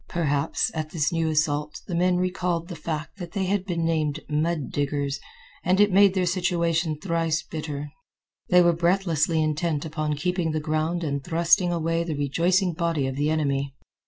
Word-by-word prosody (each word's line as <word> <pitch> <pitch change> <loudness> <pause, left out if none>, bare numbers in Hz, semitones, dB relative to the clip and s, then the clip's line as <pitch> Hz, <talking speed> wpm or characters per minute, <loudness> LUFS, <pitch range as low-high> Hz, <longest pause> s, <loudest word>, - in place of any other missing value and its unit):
Perhaps, 145 -3 0
at 155 -1 -3
this 155 0 0
new 165 -1 0
assault 150 -2 0
the 180 - -6
men 180 +1 +2
recalled 180 -1 -1
the 175 - -5
fact 155 +3 -5
that 175 -2 -7
they 195 -1 -1
had 190 0 0
been 170 -3 -1
named 155 -2 0
mud 155 0 -1
diggers, 140 -1 -1 0.4
and 185 +2 +2
it 205 0 +5
made 200 0 +6
their 185 -1 +2
situation 170 -3 0
thrice 165 -2 0
bitter. 150 -2 -5 0.6
They 180 -1 +6
were 175 0 +4
breathlessly 170 -2 +1
intent 155 0 -1
upon 155 -1 -2
keeping 175 +1 -1
the 155 - 0
ground 155 +3 -1
and 140 -3 -2
thrusting 175 +2 +3
away 165 0 0
the 165 -3 -3
rejoicing 170 +6 +1
body 165 -4 0
of 135 0 -3
the 145 +2 0
enemy. 140 -3 -1
165 Hz, 175 wpm, -25 LUFS, 150-175 Hz, 0.6 s, made